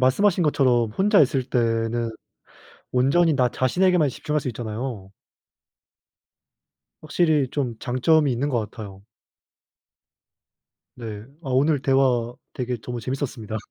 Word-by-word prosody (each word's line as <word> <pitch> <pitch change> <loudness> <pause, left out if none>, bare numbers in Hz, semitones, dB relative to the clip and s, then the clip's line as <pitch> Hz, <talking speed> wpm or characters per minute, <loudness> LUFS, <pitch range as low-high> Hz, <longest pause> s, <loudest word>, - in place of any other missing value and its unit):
말씀하신 175 +9 +3
것처럼 125 -7 +2
혼자 195 - +3
있을 135 -2 +2
때는 115 -1 0 0.8
온전히 145 +6 +3
나 125 -2 +2
자신에게만 165 +4 +2
집중할 150 +4 -2
수 130 - -5
있잖아요. 110 -3 -5 1.9
확실히 155 -3 +1
좀 125 -6 -2
장점이 140 +4 +2
있는 135 +5 -1
것 125 -4 0
같아요. 100 -4 -10 1.9
네 110 -3 -7 0.2
아 135 - -7
오늘 140 +2 +2
대화 130 -3 +1 0.2
되게 125 -1 -3
정말 120 0 -6
재밌었습니다. 125 -4 -4
130 Hz, 260 characters per minute, -23 LUFS, 120-145 Hz, 1.9 s, 말씀하신